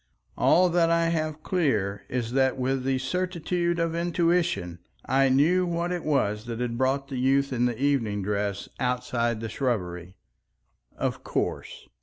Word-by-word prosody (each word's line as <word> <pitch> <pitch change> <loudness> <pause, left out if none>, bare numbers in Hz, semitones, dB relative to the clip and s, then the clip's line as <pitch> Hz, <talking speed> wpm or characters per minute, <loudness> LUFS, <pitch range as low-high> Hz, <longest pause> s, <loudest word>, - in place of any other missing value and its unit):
All 180 +1 +4
that 170 -1 +3
I 165 0 +2
have 155 -2 -2
clear 105 - 0
is 120 -2 -2
that 130 0 +2
with 130 0 -1
the 135 0 +1
certitude 175 +3 -1
of 165 -1 0
intuition 170 - 0 0.3
I 135 0 +3
knew 165 +8 +3
what 170 +1 -1
it 175 -2 -3
was 105 -8 0
that 115 -1 -5
had 120 -1 -2
brought 135 +3 0
the 130 -3 -3
youth 135 +1 +2
in 125 0 +1
evening 115 -5 0
dress 100 0 -2
outside 120 -2 -1
the 115 - -3
shrubbery. 90 -8 -3 0.8
Of - - -2
course! - - -3
135 Hz, 150 wpm, -26 LUFS, 115-165 Hz, 0.8 s, All